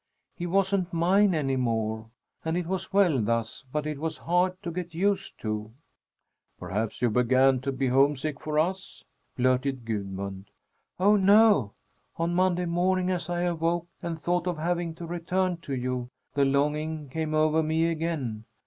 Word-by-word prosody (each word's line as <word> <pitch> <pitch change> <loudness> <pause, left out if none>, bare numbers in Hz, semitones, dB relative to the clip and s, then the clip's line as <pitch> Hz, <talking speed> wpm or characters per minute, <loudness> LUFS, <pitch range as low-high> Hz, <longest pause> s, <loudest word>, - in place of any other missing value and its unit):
He 175 - -4
wasn't 190 0 +1
mine 185 +3 +3
any 135 -4 0
more. 110 -3 -1 0.4
And 160 +1 -1
it 180 - -2
was 190 +1 -3
well 180 - +3
thus, 115 +3 -1
but 150 +1 -2
it 150 -2 -3
was 160 +1 -3
hard 180 +2 +1
to 170 - -3
get 175 -1 -5
used 195 +2 0
to." 110 0 -4 0.8
"Perhaps 110 +4 -3
you 120 - +3
began 130 +3 +4
to 135 +1 -2
be 135 0 -1
homesick 140 +2 +2
for 155 -1 -3
us?" 185 +5 -1 0.3
blurted 130 0 +1
Gudmund. 100 -3 -4 0.5
"Oh, 205 +3 +5
no! 200 - +5 0.4
On 170 +1 0
Monday 180 0 +2
morning, 180 +2 +1
as 175 -1 -3
I 175 0 -1
awoke 170 0 0
and 165 -2 -4
thought 175 +3 0
of 175 -2 -1
having 170 0 -1
to 170 - -7
return 175 +2 -1
to 140 -5 -5
you, 125 -1 -3 0.2
the 140 0 +3
longing 150 +2 0
came 155 +2 -2
over 155 +1 +3
me 160 +1 +1
again. 155 -10 -3
160 Hz, 160 wpm, -27 LUFS, 130-175 Hz, 0.8 s, Oh